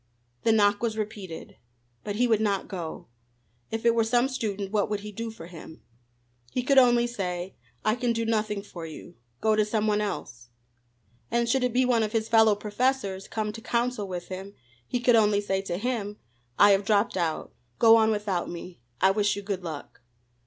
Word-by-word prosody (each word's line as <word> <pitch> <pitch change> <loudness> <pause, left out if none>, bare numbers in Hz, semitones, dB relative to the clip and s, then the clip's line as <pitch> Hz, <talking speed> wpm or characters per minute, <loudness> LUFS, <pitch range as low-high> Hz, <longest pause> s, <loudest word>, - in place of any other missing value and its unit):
The 225 - +3
knock 205 -2 +3
was 225 -2 -1
repeated. 205 -6 -6 0.5
But 205 -1 -4
he 245 +3 +2
would 220 -2 +2
not 200 -3 0
go. 175 -5 -6 0.6
If 225 +1 -4
it 235 - +5
were 230 -1 +3
some 240 +3 +2
student, 210 -6 -3
what 210 -1 +1
could 210 -1 -2
he 210 +1 -7
do 230 +3 -5
for 220 -7 -10
him? 165 -2 -12 0.7
He 250 - -1
could 270 +1 +6
only 240 -2 +5
say: 185 -6 -4 0.3
"I 215 - +4
can 245 0 0
do 230 0 -1
nothing 215 -2 -1
for 175 -4 -9
you. 160 +2 -10 0.3
Go 220 -1 +3
to 215 - +3
some 210 0 -1
one 210 -1 +2
else." 120 - -5 0.8
And 235 0 +1
should 255 +2 +2
it 250 - +1
be 255 +2 +3
one 240 -2 +3
of 215 0 -1
his 220 -1 0
fellow 220 -2 +5
professors, 210 -2 -1
come 215 -1 -2
to 225 - -9
counsel 235 -3 -1
with 180 -2 -6
him, 190 +2 -7 0.3
he 245 - -1
could 245 0 +4
only 210 -2 +4
say 195 -2 -1
to 175 -3 -3
him: 210 -2 -3 0.4
"I 205 0 +7
have 195 0 +3
dropped 205 0 +2
out. 170 -4 -2 0.2
Go 225 -1 +7
on 220 -1 +4
without 205 -4 -1
me. 175 -1 -8 0.2
I 190 - +6
wish 205 +1 +1
you 205 - -6
good 195 -2 -3
luck." 155 -7 -7
210 Hz, 200 wpm, -27 LUFS, 195-230 Hz, 0.8 s, I